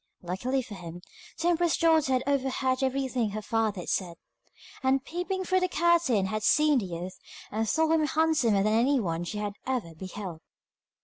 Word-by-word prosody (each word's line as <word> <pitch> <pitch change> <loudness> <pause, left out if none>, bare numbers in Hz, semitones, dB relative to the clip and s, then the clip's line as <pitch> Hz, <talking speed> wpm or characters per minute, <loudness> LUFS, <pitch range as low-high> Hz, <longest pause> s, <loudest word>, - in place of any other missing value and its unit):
Luckily 245 +10 -1
for 235 -3 -10
him, 175 -2 -9 0.4
the 340 +2 +2
emperor's 345 -1 +2
daughter 320 -5 +3
had 255 0 +1
overheard 265 -1 0
everything 260 -3 0
her 215 +1 -4
father 220 -3 0
had - - -7
said, 175 -3 -1 0.6
and 265 +1 +1
peeping 360 +4 -3
through 370 +1 +2
a - - +3
curtain 335 - +3
had 215 +3 -2
seen 300 +4 +4
the 195 - -4
youth, 175 +2 -6 0.3
and 220 +1 -1
thought 320 0 +2
him 310 -2 +2
handsomer 295 -11 +2
than 215 +1 +2
anyone 225 -9 +1
she 210 - -5
had 205 -1 -3
ever 245 -11 -2
beheld. 185 -1 -7
255 Hz, 175 wpm, -28 LUFS, 200-300 Hz, 0.6 s, seen